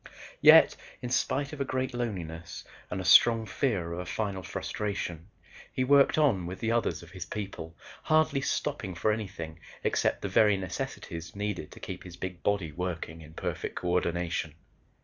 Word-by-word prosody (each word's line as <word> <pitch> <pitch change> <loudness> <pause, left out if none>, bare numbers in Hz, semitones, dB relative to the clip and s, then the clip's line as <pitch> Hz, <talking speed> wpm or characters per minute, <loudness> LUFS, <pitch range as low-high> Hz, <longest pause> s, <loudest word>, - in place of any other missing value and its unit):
Yet, - - +8 0.3
in 120 - -3
spite 140 +3 0
of 145 - -5
a - - +4
great 130 -1 -2
loneliness 90 -9 -4 0.3
and 95 - -3
a 95 - -4
strong 115 +4 +7
fear 95 - -1
of 85 - -4
a 90 - -4
final 100 -2 -2
frustration, 90 -3 -4 0.4
he 130 - 0
worked 140 +2 +5
on 115 - +3
with 90 +2 -6
the 115 - 0
others 115 -6 0
of 85 - -14
his 90 -2 -6
people, 95 -5 -6 0.2
hardly 155 -3 +3
stopping 130 -9 -2
for 105 +6 +2
anything 90 -7 -5 0.2
except - - +1
the - - 0
very 105 -2 +4
necessities 85 -2 -5
needed 100 -6 -3
to - - -12
keep - - -7
his 90 -1 -10
big 90 -2 -5
body 100 -6 0
working 85 -1 -4
in 80 0 -13
perfect - - -4
coordination. 85 -3 -1
95 Hz, 170 wpm, -29 LUFS, 85-115 Hz, 0.4 s, Yet